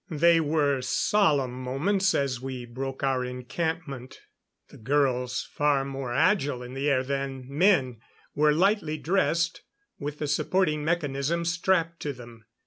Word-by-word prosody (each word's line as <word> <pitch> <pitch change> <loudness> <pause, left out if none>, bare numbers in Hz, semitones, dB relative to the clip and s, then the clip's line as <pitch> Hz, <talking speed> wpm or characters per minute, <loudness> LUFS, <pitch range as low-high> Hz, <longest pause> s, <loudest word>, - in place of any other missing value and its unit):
They 165 +1 +4
were 145 -3 +1
solemn 145 -3 +2
moments 150 +11 0
as 130 -3 -1
we 130 -2 -5
broke 130 +3 -6
our 135 -2 +1
encampment. 135 +1 -4 0.5
The - - -14
girls, 125 0 0
far 145 -2 +2
more 135 -2 -5
agile 145 -3 +1
in 125 +1 -9
the 135 +2 -1
air 130 -2 +2
than 135 -1 -3
men, 140 - +2 0.3
were 150 +1 +3
lightly 175 -1 +1
dressed, 170 +1 0 0.4
with 145 +1 -5
the 150 - -3
supporting 155 +1 +1
mechanism 160 0 -1
strapped 165 0 +1
to 145 - -3
them. 120 -3 -13
140 Hz, 135 wpm, -27 LUFS, 130-165 Hz, 0.5 s, They